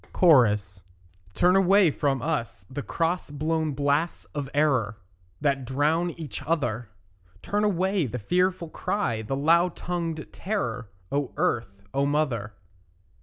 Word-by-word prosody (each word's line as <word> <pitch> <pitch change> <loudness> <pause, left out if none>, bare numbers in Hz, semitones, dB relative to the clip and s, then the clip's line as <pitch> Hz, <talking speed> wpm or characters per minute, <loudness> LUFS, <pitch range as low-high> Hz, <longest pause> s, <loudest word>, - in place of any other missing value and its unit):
CHORUS 105 - +4 0.5
Turn 180 +1 +4
away 195 -2 +5
from 135 -3 0
us 120 - -2
the 145 +2 -3
cross 165 +4 -1
blown 155 +1 -1
blasts 145 +4 0
of 145 -2 -4
error, 130 -8 +1 0.4
That 140 -2 +1
drown 150 +7 +1
each 155 -4 -6
other; 120 -8 -1 0.5
Turn 205 +1 0
away 190 -4 +1
the 125 - -4
fearful 180 - 0
cry, 155 - -1
the 110 +5 -3
loud 165 +5 +3
tongued 165 -3 -3
terror, 125 - -3 0.2
O 145 0 -1
Earth, 100 -4 -1
O 140 +1 +1
mother. 135 -8 -1
145 Hz, 125 wpm, -26 LUFS, 125-170 Hz, 0.5 s, away